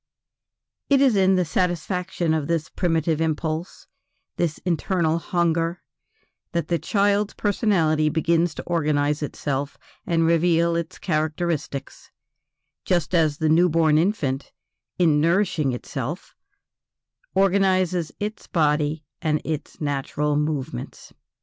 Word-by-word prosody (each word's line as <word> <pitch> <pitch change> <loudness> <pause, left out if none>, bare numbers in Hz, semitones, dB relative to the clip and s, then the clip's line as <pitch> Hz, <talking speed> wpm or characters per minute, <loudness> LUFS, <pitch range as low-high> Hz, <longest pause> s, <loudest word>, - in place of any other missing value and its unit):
It 280 -1 +5
is 265 -5 +4
in 190 -1 +4
the 180 -1 +2
satisfaction 180 0 -1
of 155 -3 -1
this 165 -2 -1
primitive 165 -2 0
impulse, 160 +1 -2 0.5
this 165 -3 -1
internal 170 -1 +1
hunger, 170 0 0 0.7
that 170 -1 -1
the 170 -1 +1
child's 200 +5 +1
personality 170 -8 +2
begins 165 +1 +1
to - - -6
organize 150 -3 0
itself 140 -1 -3 0.3
and 165 -1 +2
reveal 170 0 +3
its 170 +1 -3
characteristics; 155 -3 -3 0.7
just 175 -2 0
as 155 -4 +2
the 160 - 0
new 170 +3 +4
born 155 -1 +3
infant, 150 -8 -1 0.5
in 160 -4 +3
nourishing 170 -4 +2
itself, 135 +6 -5 1.0
organizes 185 -4 +2
its 210 +1 -5
body 150 -1 +1 0.2
and 155 -1 +1
its 155 -2 -5
natural 145 0 -1
movements. 145 - -4
165 Hz, 110 wpm, -23 LUFS, 150-180 Hz, 1.0 s, It